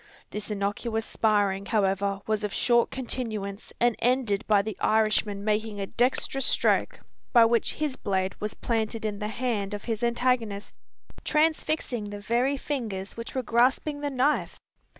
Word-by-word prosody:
This 210 0 -5
innocuous 210 +2 -2
sparring, 200 -3 +1
however, 200 -2 +1
was 215 -1 -1
of 210 - -1
short 240 +2 +3
continuance 220 -6 -4
and 240 -1 +3
ended 240 -4 +1
by 205 -2 +4
the 220 0 -4
Irishman 215 -2 +2
making 215 0 -1
a 195 - -1
dexterous 255 +4 +2
stroke, - - +1 0.3
by 235 -2 +8
which 230 0 +2
his 295 -3 -2
blade 190 -1 -1
was 210 0 -3
planted 225 -1 -2
in 205 -1 -2
the 210 - -2
hand 215 -3 -2
of 205 - -7
his 225 -3 -3
antagonist, 235 -4 0 0.5
transfixing 305 -7 0
the 205 0 -6
very 240 +6 +1
fingers 220 -10 -4
which 230 +3 -7
were 260 - 0
grasping 255 +6 +2
the 290 - -1
knife! 275 +2 0
220 Hz, 150 wpm, -27 LUFS, 205-250 Hz, 0.5 s, by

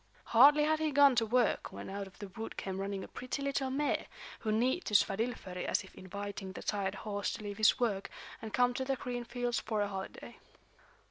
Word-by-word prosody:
Hardly 290 +6 +8
had 310 +1 +2
he 315 0 +1
gone 285 -2 +6
to 225 -1 +3
work 245 +1 +2
when - - -7
out 195 0 -5
of 190 - -17
the 205 - -7
wood 220 +4 -7
came 190 -1 -4
running 195 -1 -3
a - - -7
pretty 255 +2 -5
little 275 -1 0
mare, 285 +3 0 0.3
who 215 - -1
neighed 250 +11 +2
to 210 - -1
Svadilföri 195 -3 +1
as - - +1
if - - -15
inviting 200 0 -6
the - - -8
tired 200 -1 -1
horse 205 -1 -1
to - - -7
leave 205 0 -6
his 215 - +5
work 205 -5 0 0.3
and 220 - -6
come 245 +1 +3
to 260 - -2
the 270 +1 0
green 245 -1 -4
fields 240 -1 -1
for 215 -2 -1
a - - -1
holiday. 195 -1 -7
220 Hz, 215 wpm, -33 LUFS, 200-255 Hz, 0.3 s, Hardly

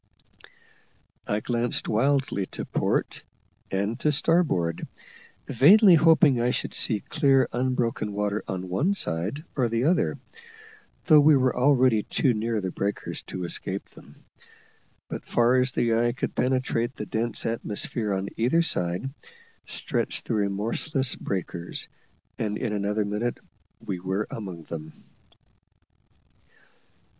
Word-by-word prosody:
I 105 +1 -1
glanced 120 0 -1
wildly 130 -4 +1
to - - -6
port - - -1 0.5
and 100 +4 -2
to 150 - +2
starboard, 150 - +1 0.6
vainly 185 - +6
hoping 160 -5 +5
I 120 - +2
should - - -2
see 105 -4 +2
clear 135 -5 +2
unbroken 120 -3 -1
water 105 +1 -1
on 95 0 -4
one 150 - 0
side 100 - -3
or 125 -4 +1
the 115 +1 0
other, 170 +6 +1 0.9
though 155 -3 +7
we 150 0 +6
were 130 -1 +1
already 130 -4 +4
too 130 +4 +1
near 110 0 -1
the 95 -1 -3
breakers 100 +3 -3
to 90 - -5
escape 85 - -2
them. - - -17 0.8
But - - -7
far 120 +2 +3
as 125 0 +2
the 120 -2 +1
eye 120 +1 +2
could - - -3
penetrate 125 -1 0
the - - -5
dense 115 0 -3
atmosphere 110 -1 -2
on 95 0 -2
either 130 +9 +2
side, 90 - 0 0.6
stretched - - -1
the - - -2
remorseless 110 +7 0
breakers, 85 -2 -4 0.5
and 105 -1 -2
in 115 -4 -2
another 105 +1 -1
minute 105 +4 -2 0.5
we 90 - -3
were 95 +3 -2
among 95 -6 -7
them. 80 -1 -8
115 Hz, 130 wpm, -26 LUFS, 100-130 Hz, 0.9 s, though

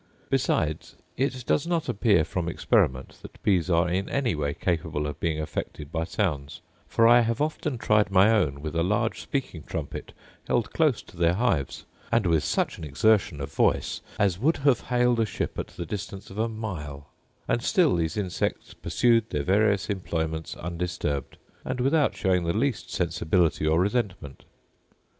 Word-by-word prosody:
Besides, 85 - 0 0.2
it 130 -1 -2
does 150 - +1
not 170 -2 0
appear 105 -7 +3
from 85 0 -3
experiment 65 -5 +1
that - - -12
bees 95 -4 +2
are 85 0 +3
in 95 +3 -1
any 130 -7 0
way 70 -2 -2
capable 80 -4 -1
of 75 +1 -5
being 80 -2 -1
affected 75 -1 -5
by 80 -1 -1
sounds: 75 -8 -2 0.3
for 115 - +4
I 120 +1 +7
have 115 -1 0
often 150 -2 -1
tried 105 -2 +2
my 100 +3 +5
own 75 -11 +1
with 80 +1 -4
a 85 - +2
large 105 +6 0
speaking 130 - -3
trumpet - - -6 0.4
held 120 -2 0
close 150 -8 +2
to - - -17
their 85 0 +3
hives, 90 - 0 0.3
and 115 -3 +2
with 80 -3 +2
such - - -1
an - - -8
exertion 90 - +2
of 70 0 -6
voice - - +1 0.2
as 95 -4 +1
would 155 +8 +2
have 135 -6 +4
hailed 125 -1 +2
a 115 - +3
ship - - -4
at - - -3
the 85 - -7
distance 100 +2 -6
of 100 - -7
a 115 +1 +1
mile, 75 - -6 0.4
and 120 - +1
still 175 - +3
these 80 +2 -1
insects 95 -4 -2
pursued 115 -2 +2
their 75 - -2
various 100 +3 +2
employments 80 -5 -3
undisturbed, 85 -5 -3 0.3
and 130 0 -3
without 140 +3 +2
showing 90 -2 +1
the 85 +4 0
least 130 -1 -1
sensibility 80 -2 +1
or 80 +2 +3
resentment. 95 - -2
95 Hz, 170 wpm, -26 LUFS, 80-115 Hz, 0.4 s, I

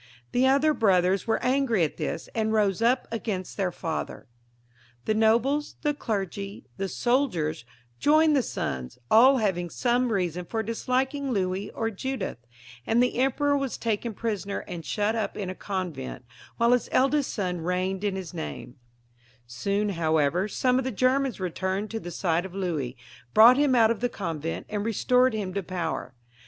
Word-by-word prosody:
The 255 +2 +3
other 280 +3 +4
brothers 190 -4 +2
were 225 - +2
angry 250 -7 +2
at 155 - -2
this, 165 - -3
and 220 -1 0
rose 210 -1 +2
up 245 +3 +2
against 210 -5 -4
their 190 -3 0
father. 160 -5 -4 0.8
The 215 - +2
nobles, 235 +7 +2
the 295 - +2
clergy, 200 - -4
the 195 0 -2
soldiers, 180 - 0 0.3
joined 310 +1 +4
the 275 - +4
sons, 65 - -4
aU 260 +5 +7
having 185 -6 0
some 245 +6 +1
reason 180 -3 -1
for 220 +4 -2
disliking 260 +5 -1
Louis 190 -1 -1
or 225 0 -2
Judith, 225 - -4 0.5
and 225 - +2
the 250 - 0
emperor 285 +2 +2
was 275 -3 -2
taken 225 0 -2
prisoner 200 -3 -3
and 170 -2 -6
shut 210 +6 0
up 220 -2 -2
in 190 -3 -3
a - - -5
convent, 170 - -5 0.3
while 235 +1 +3
his 250 -1 +2
eldest 275 +2 +2
son 180 -5 -2
reigned 185 +3 -1
in 200 -2 0
his 190 -2 -6
nama 160 -2 -6 0.8
Soon, 200 - -1
however, 160 0 +1
some 255 +4 +1
of - - -1
the 260 - -1
Germans 260 +2 +1
returned 190 +3 -2
to 225 - -3
the 175 - -7
side 175 -1 0
of 190 -1 -9
Louis, 155 -10 -2 0.4
brought 235 +4 +9
him 285 -2 +3
out 225 -2 +5
of 230 - -2
the 245 - 0
convent, 165 -6 -4
and 210 -1 -3
restored 250 +3 +2
him 195 -4 -3
to 200 - -1
power. 170 -8 -4
210 Hz, 170 wpm, -26 LUFS, 180-250 Hz, 0.8 s, brought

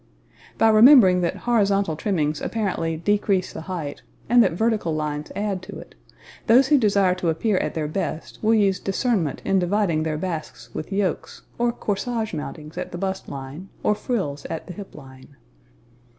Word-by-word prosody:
By 225 - +5
remembering 215 -5 +7
that 170 - 0
horizontal 200 -7 +2
trimmings 155 -4 -1
apparently 175 -7 -2
decrease 195 +1 0
the - - -6
height, 160 -5 -5 0.3
and 240 +1 +6
that 190 -7 +3
vertical 215 -4 0
lines 150 -1 -3
add 200 -2 -2
to 185 - -9
it, - - -12 0.5
those 250 +4 +5
who 295 -2 +5
desire 200 -4 +3
to 180 -2 -1
appear 190 +5 0
at - - -3
their 155 -2 -1
best 155 0 -4
will 225 +1 +3
use 195 -3 +2
discernment 195 - -1
in 195 - +2
dividing 180 -3 +1
their 155 -1 -2
basques 165 -2 -6
with 155 - -6
yokes, 195 -4 -2 0.2
or 240 0 +2
corsage 220 0 -3
mountings 155 0 -6
at - - -5
the 175 - -5
bust 190 +1 -4
line 140 +7 -8
or - - +3
frills 195 - -3
at 160 - -5
the 180 - -8
hip 200 +2 -10
line. 135 -1 -14
190 Hz, 170 wpm, -23 LUFS, 160-210 Hz, 0.5 s, remembering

